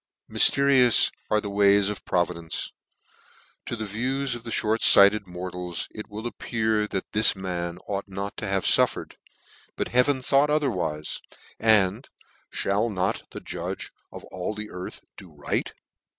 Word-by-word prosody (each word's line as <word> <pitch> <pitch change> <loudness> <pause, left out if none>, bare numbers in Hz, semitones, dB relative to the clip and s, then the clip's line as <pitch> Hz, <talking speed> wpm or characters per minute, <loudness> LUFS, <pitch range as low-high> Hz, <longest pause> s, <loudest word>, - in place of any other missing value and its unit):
Myfterious 135 -4 +4 0.2
are 105 - +3
the 105 -1 -5
ways 100 0 +4
of 105 0 -5
providence! 85 -2 -2 1.0
To - - -2
the 110 -1 -3
view 125 +7 -2
of 120 -3 -3
inert 110 0 +3
lighted 100 0 +5
mortals 90 -1 -5
it 105 - -9
will 105 +2 -7
appear 110 -2 -1
that 95 -2 -4
this 110 0 +4
man 90 -2 -4
ought 100 -1 -3
not 100 +1 -5
to 105 - -4
have 95 -1 -1
fnffered: - - +2 0.6
but - - -2
heaven 130 +2 +2
thought 140 +3 +3
otherwife, 100 - -1 0.4
and 110 +2 +3 0.3
" - - -7
mail 105 +4 +1
not 95 -4 -2
the - - -8
Judge - - -5 0.2
of - - -10
all 90 +4 -4
the 105 0 -7
earth 90 0 -7 0.2
do 90 - -12
right 75 -1 -2
105 Hz, 150 wpm, -25 LUFS, 95-115 Hz, 1.0 s, lighted